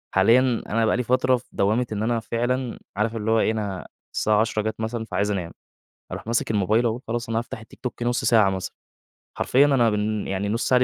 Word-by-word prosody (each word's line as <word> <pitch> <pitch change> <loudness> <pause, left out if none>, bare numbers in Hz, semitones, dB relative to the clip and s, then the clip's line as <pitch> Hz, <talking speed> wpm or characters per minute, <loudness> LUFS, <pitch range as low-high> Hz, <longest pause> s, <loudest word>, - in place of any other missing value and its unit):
حاليًا 125 0 +4
أنا 115 +1 +2
بقى - - +2
لي 125 - 0
فترة 130 +1 +2
في - - -15
دوامة 110 +5 +1
إن 105 0 -2
أنا 115 0 +1
فعلًا، 120 +2 -2 0.2
عارف 110 +2 0
اللي 110 0 -1
هو 115 - +4
إيه 110 - +2
أنا 100 -4 -4 0.3
الساعة 105 -1 +2
22:00 110 -1 0
جات 110 +1 -4
مثلًا 115 0 -3
فعايز 100 0 -1
أنام، 90 -4 -3 0.6
أروح - - -7
ماسِك 115 -1 0
الموبايل 105 +3 +2
أهو 115 +1 0
خلاص 115 0 -3
أنا 115 - +1
هافتح 115 -1 -6
التيك 110 - -16
توك 120 -1 -5
نُص 120 0 0
ساعة 110 -4 +5
مثلًا، 95 -1 -4 0.7
حرفيًا 135 +3 +4
أنا 125 -5 +3
بن 105 0 -1
يعني 95 +1 -2
النُص 115 +3 -1
ساعة 125 - +5
115 Hz, 215 wpm, -24 LUFS, 105-120 Hz, 0.7 s, ساعة